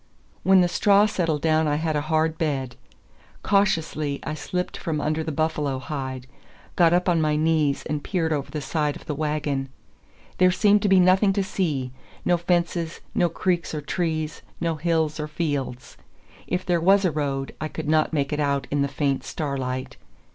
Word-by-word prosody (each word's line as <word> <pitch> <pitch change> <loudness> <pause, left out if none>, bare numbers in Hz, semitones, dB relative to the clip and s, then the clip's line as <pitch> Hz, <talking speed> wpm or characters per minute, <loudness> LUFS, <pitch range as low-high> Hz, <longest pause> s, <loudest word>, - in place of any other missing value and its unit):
When 190 -1 +5
the 175 - +3
straw 200 +3 +4
settled 165 -7 -1
down 160 -1 +3
I 145 - +1
had 155 0 -1
a 150 - +1
hard 160 +2 0
bed. 135 -6 -1 0.7
Cautiously 160 -7 +1
I 155 - -3
slipped 180 +4 -3
from 155 -2 -3
under 155 +2 -1
the 160 - -3
buffalo 150 -3 -1
hide, 130 -2 -5 0.5
got 170 -2 +5
up 180 +1 +2
on 170 -3 +3
my 155 -1 +2
knees 155 -2 +1
and 150 -1 -3
peered 165 -5 0
over 140 -2 -3
the 150 - -4
side 150 +1 -1
of - - -12
the 150 - -3
wagon. 145 -2 -2 0.7
There 185 0 +6
seemed 205 +2 +4
to 205 - +1
be 190 -1 +6
nothing 185 +2 +4
to 200 0 0
see; 150 -10 -2 0.3
no 175 - +3
fences, 170 -1 -1
no 175 - +2
creeks 170 -1 -1
or 150 - -3
trees, 155 -1 -2 0.2
no 170 -1 0
hills 160 -1 0
or 150 - -2
fields. 145 -5 -3 0.5
If 180 0 -2
there 175 -2 +1
was 195 +3 +4
a 180 - +2
road, 140 -2 -2
I 155 - -1
could 155 0 -6
not 155 0 +2
make 145 -3 -1
it 150 - -1
out 140 -2 0
in 145 0 +1
the 140 - +2
faint 140 0 -1
starlight. 130 -3 -4
155 Hz, 185 wpm, -24 LUFS, 145-175 Hz, 0.7 s, There